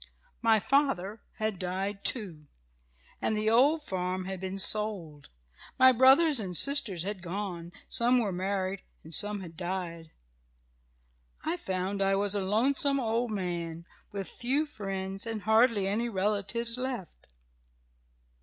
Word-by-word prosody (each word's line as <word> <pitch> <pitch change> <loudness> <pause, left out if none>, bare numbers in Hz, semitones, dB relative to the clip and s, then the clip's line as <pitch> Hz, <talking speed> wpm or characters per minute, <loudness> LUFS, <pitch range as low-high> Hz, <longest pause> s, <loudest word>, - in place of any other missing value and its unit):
"My 225 -2 +4
father 225 -6 +1
had 215 -4 -3
died 195 +2 -3
too, 175 - -2 0.7
and 215 - 0
the 215 +1 +1
old 290 +7 +4
farm 185 -3 -3
had 190 0 -5
been 190 +1 -4
sold. 195 -8 +1 0.5
My 260 -1 +8
brother 260 +6 +6
and 215 - 0
sisters 235 - +3
had 200 -1 -4
gone 175 -2 -5 0.2
some 245 0 +3
were 220 -5 +1
married 190 +1 -2 0.2
and 160 - -11
some 205 +4 +1
had 170 -3 -10
died. 175 -2 -5 1.4
I 325 +2 0
found 190 - -3
I 195 0 +3
was 200 0 +1
a 205 - 0
lonesome 275 - +1
old 235 0 0
man, 170 -4 -4 0.3
with 195 -3 -5
few 265 - -1
friends, 195 -5 -5
and 225 -2 -4
hardly 220 -2 +3
any 225 +4 0
relatives, 215 +4 -1
left. 245 - -5
200 Hz, 135 wpm, -29 LUFS, 185-235 Hz, 1.4 s, My